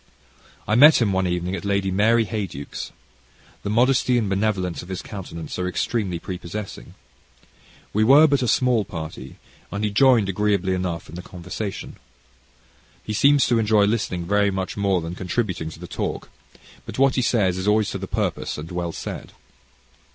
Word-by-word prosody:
I 105 - 0
met 145 +7 +8
him 105 -5 +1
one 95 0 +1
evening 90 +1 -2
at - - -6
Lady 100 -1 0
Mary 110 +4 +3
Heyduke's. 95 -10 -5 0.7
The - - -4
modesty 125 +2 +3
and 115 -3 0
benevolence 95 -3 -1
of 90 - -12
his 95 - -5
countenance 90 -5 -7
are 90 - -1
extremely 95 0 -1
prepossessing. 90 +3 -7 1.0
We 110 - +3
were 140 +7 +7
but 140 -3 +2
a 125 - 0
small 125 -3 +2
party, 80 -9 -7 0.4
and 100 +1 -3
he 105 - 0
joined 115 -1 +4
agreeably 100 -1 +1
enough 90 -3 -3
in - - -13
the 90 - -6
conversation, 90 +3 -6 1.1
He 105 - -4
seems 140 +5 +4
to 120 -2 +2
enjoy 105 -1 +3
listening 100 -5 -1
very 100 +2 +2
much 95 -1 -3
more 100 -3 +1
than 80 +1 -5
contributing 90 -2 -2
to - - -11
the - - -8
talk; - - -4 0.6
but - - -7
what 135 0 +4
he 130 - +1
says 100 -7 +1
is 95 - -3
always 105 0 +2
to - - -4
the - - -5
purpose - - -2
and 75 +3 -7
well 85 -1 -2
said. - - -7
100 Hz, 175 wpm, -23 LUFS, 90-110 Hz, 1.1 s, met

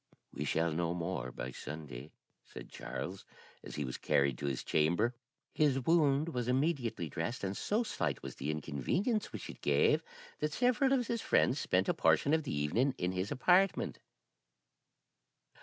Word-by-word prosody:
'We - - -3
shall 85 0 +1
know 85 +2 -1
more 85 -7 -3
by 65 - -5
Sunday,' 75 -1 -8 0.3
said - - -11
Charles, - - -6 0.4
as - - -8
he 75 - -2
was 65 - -5
carried 70 -2 +2
to 70 - -2
his 70 -2 -2
chamber. 85 +10 +2 0.4
His 145 -3 +3
wound 150 +1 +3
was 125 -6 -2
immediately 125 - 0
dressed, 85 - -4
and 95 0 -2
so 215 - 0
slight 85 - -2
was - - -6
the 70 - -3
inconvenience 75 - -1
which - - -6
it - - -10
gave - - +3 0.4
that 150 -1 -1
several 250 - +3
of 260 -3 +3
his 230 -1 -2
friends 130 +3 +3
spent 95 -4 +1
a - - +3
portion 145 - +3
of 160 - +3
the 150 - -5
evening 115 - +1
in 90 0 -1
his 95 +2 -2
apartment. 180 +7 +3
105 Hz, 165 wpm, -33 LUFS, -, 0.4 s, His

